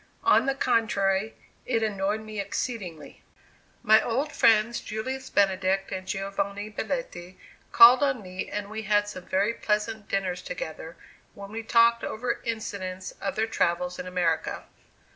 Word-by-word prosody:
On - - +4
the 270 - +1
contrary 215 -5 +1 0.3
it 230 -3 0
annoyed 205 0 -1
me 215 -1 -7
exceedingly. 195 -6 -5 0.6
My 220 +1 +6
old 270 +6 -1
friends 225 -1 +3
Julius 260 +5 -5
Benedict 195 -1 +1
and 185 0 -5
Giovanni 200 +1 -3
Belletti, 205 -6 -5 0.3
called 240 +3 +9
on 265 -6 +1
me 185 0 -6
and 205 0 -5
we 220 0 -4
had 205 -1 +2
some 185 -3 -8
very 200 +4 +1
pleasant 215 -1 -2
dinners 185 -2 -1
together, - - -7 0.4
when 200 0 -10
we 225 +1 -4
talked 235 +1 +4
over 240 +3 -3
incidents 195 -5 -4
of 195 - -2
their 220 - +1
travels 180 -5 -1
in 180 - -5
America. 175 -3 -1
210 Hz, 145 wpm, -26 LUFS, 190-230 Hz, 0.6 s, called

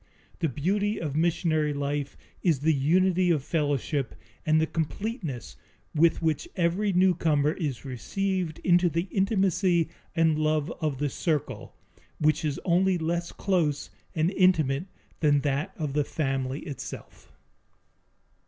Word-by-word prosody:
The 165 -3 +1
beauty 200 - 0
of 150 -4 -3
missionary 160 -2 +1
life 140 0 -2 0.2
is 160 -7 +2
the 160 +2 +3
unity 180 +6 +3
of 155 -6 +2
fellowship 145 -4 -1 0.3
and 155 0 +4
the 160 - +3
completeness 160 - -4 0.4
with 165 +2 +3
which 160 - 0
every 185 +3 +1
newcomer 165 -5 +3
is 145 - -4
received 180 - -2
into 175 0 +4
the 170 +3 -1
intimacy 190 -4 +2 0.3
and 160 -2 +3
love 155 0 +1
of 150 -4 -1
the 145 +1 -1
circle, 155 +2 -2 0.4
which 155 +2 +2
is 150 -3 -1
only 185 +1 +3
less 170 +1 -2
close 165 -7 0 0.2
and 160 +2 +2
intimate 170 -6 +3 0.3
than 145 -2 +3
that 145 +6 -1
of 150 -4 -3
the 150 0 +2
family 135 -2 -2
itself. 145 - -9
160 Hz, 130 wpm, -27 LUFS, 145-180 Hz, 0.4 s, and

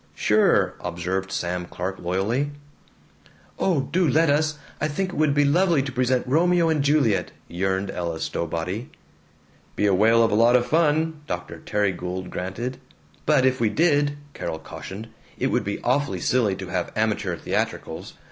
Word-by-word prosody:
"Sure," - - +3
observed 95 +2 -3
Sam 90 0 -2
Clark 95 +3 -5
loyally. 100 +11 0 1.1
"Oh, 175 -7 +2
do 170 +6 +1
let 155 +3 +4
us! 150 +1 +1 0.2
I 150 - +2
think 185 +6 -2
it - - -8
would 150 -2 +2
be 145 0 +4
lovely 165 0 +3
to 135 - -4
present 125 0 +1
'Romeo 170 +4 +3
and 155 -3 +1
Juliet'!" 140 -8 +2 0.2
yearned 95 +2 -1
Ella 85 -2 -3
Stowbody. 90 - -3 0.9
"Be 105 - +1
a 100 - +4
whale 115 +4 +5
of 115 - +2
a - - 0
lot 115 +3 +5
of 120 -1 +3
fun," 160 0 +1
Dr. - - -5
Terry 105 -1 0
Gould 90 +1 -5
granted. 115 +8 -4 0.5
"But 145 -4 +4
if 130 0 +2
we 115 -2 +2
did," 145 +2 +2 0.2
Carol 80 - -4
cautioned, 95 +7 -8 0.3
"it - - 0
would - - +1
be - - -3
awfully 145 0 +1
silly 115 -7 +1
to 95 -2 -7
have 90 -1 -2
amateur 105 -5 0
theatricals. - - -3
120 Hz, 165 wpm, -24 LUFS, 95-145 Hz, 1.1 s, whale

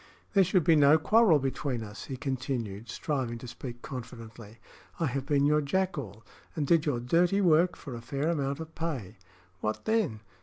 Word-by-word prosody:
"There 195 -2 +6
should 185 -1 +2
be 165 0 +5
no 145 +1 +6
quarrel 210 +1 +5
between 135 -3 -2
us," 105 +1 -9
he 135 - -6
continued, 125 -6 -4
striving 130 -8 -2
to 125 - -9
speak 120 0 -8
confidently. 115 -4 -9 0.4
"I 165 - +1
have 135 -1 -2
been 145 -2 +3
your 150 +1 +3
jackal, 140 - -2 0.3
and 150 - -1
did 165 +1 +3
your 130 -5 +1
dirty 175 +10 +2
work 175 -1 +4
for 135 - -9
a 120 - -6
fair 140 +6 -2
amount 140 -3 -1
of 160 0 -8
pay. 145 - -4 0.4
What 110 +4 -3
then? 215 - 0
140 Hz, 180 wpm, -29 LUFS, 120-160 Hz, 0.4 s, There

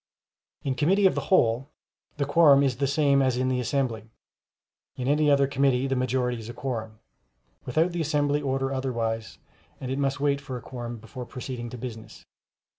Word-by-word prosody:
In 135 - 0
committee 185 +10 +2
of 190 - +5
the - - -3
whole, 125 -5 +3 0.5
the 140 - 0
quorum 145 -1 +6
is 130 -4 +1
the 140 +1 +1
same 140 -1 +3
as 130 -2 +1
in 130 0 +1
the 130 -1 0
assembly; 120 -3 -2 0.9
in 125 - -4
any 150 +1 +3
other 140 -1 +5
committee 135 -1 +1
the 135 0 0
majority 125 -1 0
is 110 0 -9
a 120 - -7
quorum, 110 -5 -4 0.7
without 160 +8 +1
the 170 -1 -2
assembly 145 -1 +1
order 135 -1 -1
otherwise, 115 -4 -2 0.4
and 130 -1 -5
it 135 - -2
must 140 0 0
wait 140 -1 +1
for 135 -2 -6
a - - -9
quorum 120 -2 -6
before 120 +3 -9
proceeding 125 -2 -6
to 125 - -8
business. 110 -3 -9
130 Hz, 185 wpm, -26 LUFS, 120-140 Hz, 0.9 s, quorum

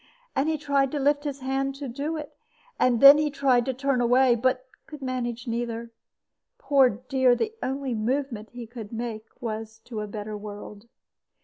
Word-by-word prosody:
And 280 +4 +1
he 315 - 0
tried 280 -2 +1
to 295 - -1
lift 290 +1 +2
his 280 -2 -4
hand 270 +1 -1
to 280 0 -6
do 285 +6 -3
it; 300 -2 -8 0.4
and 245 -2 +3
then 280 +2 +10
he 305 0 +1
tried 265 -4 +2
to 265 - -1
turn 270 -1 0
away, 245 +1 +4
but 255 +2 0 0.2
could 300 -3 -10
not 255 -1 -2
manage 240 0 -4
either. 235 0 -3 0.7
Poor 280 - +4
dear! 255 +2 +2
the 440 - -2
only 270 -1 -2
movement 230 0 -2
he 245 -1 -8
could 225 -2 -9
make 225 -2 -5 0.2
was 220 -1 -5
to 220 -4 -5
a 210 - -4
better 210 0 -6
world. 205 +1 -9
255 Hz, 185 wpm, -26 LUFS, 230-275 Hz, 0.7 s, then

